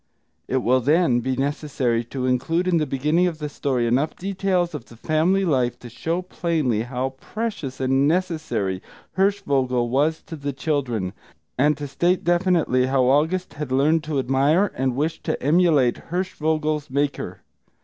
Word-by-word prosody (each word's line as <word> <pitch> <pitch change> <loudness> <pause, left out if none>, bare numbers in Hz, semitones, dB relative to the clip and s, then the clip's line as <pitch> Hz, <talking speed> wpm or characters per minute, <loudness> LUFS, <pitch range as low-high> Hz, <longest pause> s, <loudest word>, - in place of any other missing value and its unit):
It 130 -1 0
will, 130 +2 +3
then, 145 -1 +3
be 130 +2 -1
necessary 135 -4 -1
to 130 +2 -4
include 160 +8 0
in 175 -2 +3
the 155 -2 0
beginning 150 +7 +1
of 165 -3 -3
the 150 -1 -4
story 130 -4 -1
enough 130 +6 +1
details 185 -2 -1
of 140 -6 -6
the 115 - -15
family 165 +8 +1
life 130 -7 +1
to 120 - -11
show 165 +8 -2
plainly 160 -11 -1
how 125 +2 -3
precious 210 - -4
and 135 +1 +2
necessary 155 - -1 0.3
Hirschvogel 135 -11 +1
was 150 +5 +1
to 165 - -8
the 145 -2 -4
children; 125 - -2 0.4
and 145 +3 +2
to 145 0 -5
state 175 +6 +1
definitely 175 -8 +2
how 130 -1 +2
August 155 +8 +1
had 145 -3 -5
learned 150 +4 +3
to 150 -2 -2
admire 140 +9 +2
and 130 -1 -1
wish 155 +4 -1
to - - -2
emulate 150 -5 +2
Hirschvogel's 155 -4 -1
maker. 140 +1 -2
145 Hz, 160 wpm, -23 LUFS, 130-165 Hz, 0.4 s, will